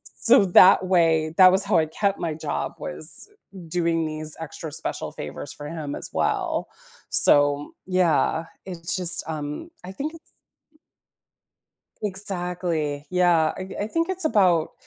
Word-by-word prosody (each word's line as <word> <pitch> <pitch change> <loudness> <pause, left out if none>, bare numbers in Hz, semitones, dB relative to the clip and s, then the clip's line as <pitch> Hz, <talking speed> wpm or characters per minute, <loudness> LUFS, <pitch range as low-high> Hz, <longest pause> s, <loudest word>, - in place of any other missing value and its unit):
so 230 -3 +5
that 185 0 +6
way 160 -3 +2
that 185 -1 +8
was 190 +2 +1
how 200 -3 +2
I 160 - +3
kept 200 +4 -1
my 165 -2 -2
job, 155 - -4
was 425 - -4 0.4
doing 165 -1 0
these 155 0 -5
extra 160 0 -7
special - - -5
favors - - -7
for 145 - -9
him 150 -3 -5
as - - -6
well. - - -1 0.4
So, 145 0 +4
yeah, 175 -3 +1 0.2
it's 175 -2 -5
just, 180 -2 0
um, 150 - -5
I 185 - -8
think 295 +10 -5
it's 330 - -18 1.7
Exactly, 180 -7 -3
yeah, 175 -3 +3
I 190 +2 -5
I - - -3
think 330 +8 -1
it's 375 -2 -2
about 180 - +2
175 Hz, 140 wpm, -24 LUFS, 155-190 Hz, 1.7 s, that